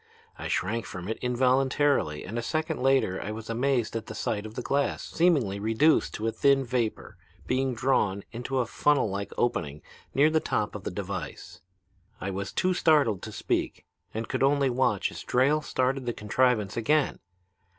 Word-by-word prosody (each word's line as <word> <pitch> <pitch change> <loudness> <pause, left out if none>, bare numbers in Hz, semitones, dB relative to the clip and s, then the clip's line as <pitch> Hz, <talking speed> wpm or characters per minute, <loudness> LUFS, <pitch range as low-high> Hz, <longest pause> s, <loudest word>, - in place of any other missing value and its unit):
I - - -6
shrank 110 +5 -1
from 90 0 -7
it 110 - -3
involuntarily 130 - +2
and 115 +5 -4
a - - -2
second 155 +5 -2
later 135 -8 +2
I 105 - -4
was 110 +1 -6
amazed 120 -1 0
at 115 - -4
the - - -7
sight 105 -1 -2
of 110 - -12
the 125 - -4
glass, 140 +3 0
seemingly 140 - +2
reduced 115 +9 +2
to 110 - -4
a 115 - +1
thin 140 +3 +3
vapor, 115 -4 -2 0.3
being 130 0 0
drawn 105 -6 +1
into 125 +3 -3
a 125 - +2
funnel 140 -2 +2
like 100 0 -4
opening 75 -11 -1 0.3
near 150 +3 +5
the 160 - +3
top 105 -8 -1
of - - -8
the - - -1
device. - - -6 0.6
I 100 - -3
was 100 +1 -4
too 185 0 +1
startled 145 - +3
to 110 - -7
speak 100 - -2 0.3
and 110 +1 -4
could - - -2
only 140 -1 +3
watch 130 +2 +1
as - - -8
Drayle 140 +5 +2
started 130 -2 -1
the 120 - 0
contrivance 110 -1 +1
again. 145 +5 +1
125 Hz, 180 wpm, -27 LUFS, 110-135 Hz, 0.6 s, near